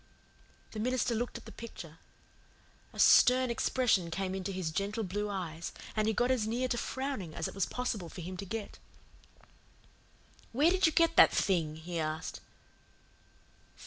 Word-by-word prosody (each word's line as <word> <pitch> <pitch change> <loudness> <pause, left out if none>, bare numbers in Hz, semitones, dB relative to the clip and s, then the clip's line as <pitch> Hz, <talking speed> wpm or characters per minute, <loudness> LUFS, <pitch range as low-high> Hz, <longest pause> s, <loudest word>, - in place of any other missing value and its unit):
The 215 - -6
minister 250 +1 0
looked 240 +2 -2
at - - -13
the - - -10
picture. 165 -8 -10 0.9
A - - -14
stern 255 0 +6
expression 230 -7 +1
came 185 +3 -2
into 190 0 -3
his 185 -4 -3
gentle 200 +6 -2
blue 205 +2 -2
eyes 170 -4 -5 0.2
and 215 0 +1
he 220 - +2
got 245 +1 +2
as 235 -5 +1
near 245 +3 0
to 240 - 0
frowning 260 - -4
as 165 - -2
it - - -8
was 195 -2 0
possible 220 -8 -3
for 180 - -8
him 185 +3 -6
to 195 - -5
get. 215 +2 -6 1.7
"Where 295 +8 +4
did 375 -2 +4
you - - +2
get 330 0 +3
that - - +9
thing?" 165 -6 +1
he 165 +2 -5
asked. 155 0 -3
205 Hz, 165 wpm, -31 LUFS, 175-245 Hz, 1.7 s, that